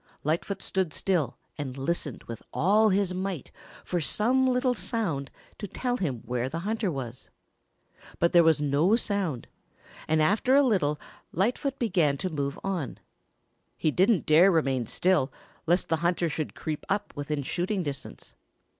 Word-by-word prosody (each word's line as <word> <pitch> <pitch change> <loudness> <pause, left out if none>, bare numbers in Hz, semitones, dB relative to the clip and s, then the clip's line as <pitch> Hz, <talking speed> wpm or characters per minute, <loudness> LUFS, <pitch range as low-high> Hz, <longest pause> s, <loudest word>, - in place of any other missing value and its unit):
Lightfoot 165 +6 -1
stood 190 -5 -1
still 170 - 0 0.2
and 135 -2 -4
listened 145 0 -2
with 115 -2 -8
all 210 +6 +4
his 195 -1 +1
might 185 -5 -4 0.3
for 175 -2 -1
some 250 - +2
little 250 0 +2
sound 185 - -2 0.3
to 205 - -4
tell 245 +6 -2
him 135 - -3
where 125 +1 -2
the 165 +4 -4
hunter 215 +1 -1
was. 130 -4 -6 0.9
But 170 - +2
there 170 -1 +7
was 160 -2 +4
no 150 +8 +3
sound 195 - -1 0.6
and 160 0 +2
after 205 +11 +3
a 285 - +6
little 165 - +1 0.3
Lightfoot 245 - 0
began 175 - +2
to 185 +2 -3
move 140 -2 -2
on. 185 -9 -3 0.8
He 155 - +1
didn't 190 +3 +3
dare 165 +5 +6
remain 135 - +1
still, 180 -8 +2 0.4
lest 175 +3 +2
the 160 - +2
hunter 170 +1 +1
should 155 -1 -4
creep 155 -2 -4
up 205 +1 -1
within 145 0 -3
shooting 185 +6 -1
distance. 140 - -7
170 Hz, 155 wpm, -27 LUFS, 145-200 Hz, 0.9 s, there